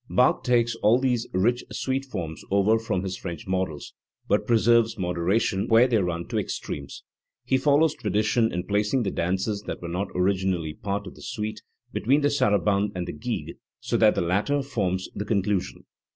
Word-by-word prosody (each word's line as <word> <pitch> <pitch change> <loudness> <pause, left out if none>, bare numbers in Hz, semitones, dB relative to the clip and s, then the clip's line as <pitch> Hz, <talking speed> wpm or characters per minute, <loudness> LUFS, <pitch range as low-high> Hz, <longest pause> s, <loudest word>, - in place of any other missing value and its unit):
Bach 125 - +3
takes 120 -1 +2
all 110 +2 +4
these 125 -3 0
rich 120 +7 +1
suite 135 +1 -2
forms 85 -11 -5
over 100 +3 +3
from 95 -5 -2
his 95 -1 -3
French 85 -4 -7
models, 95 -5 -3 0.3
but - - +1
preserves 115 0 +3
moderation 95 +2 0
where 115 +2 +6
they 120 -3 +2
run 85 -2 -2
to - - -1
extremes*. 70 -1 -5 0.4
He 130 - +2
follows 150 +3 +3
tradition 110 0 +1
in 90 0 -2
placing 105 +5 +1
the 95 - -1
dances 95 +4 -1
that - - -4
were 85 - -6
not 90 +4 -2
originally 90 -4 0
part 100 +4 -4
of 95 - -9
the - - -15
suite 110 0 -4 0.3
between 135 +7 +2
the 145 0 +2
sara 130 -8 +3
bande 100 +2 0
and 90 -1 -3
the - - -4
gigue, 75 - -5 0.2
so - - -2
that - - +5
the - - +1
latter 105 +12 +1
forms 95 -9 -2
the 105 - -3
con 105 -2 0
clusion. 100 -2 -2
105 Hz, 185 wpm, -25 LUFS, 90-120 Hz, 0.4 s, where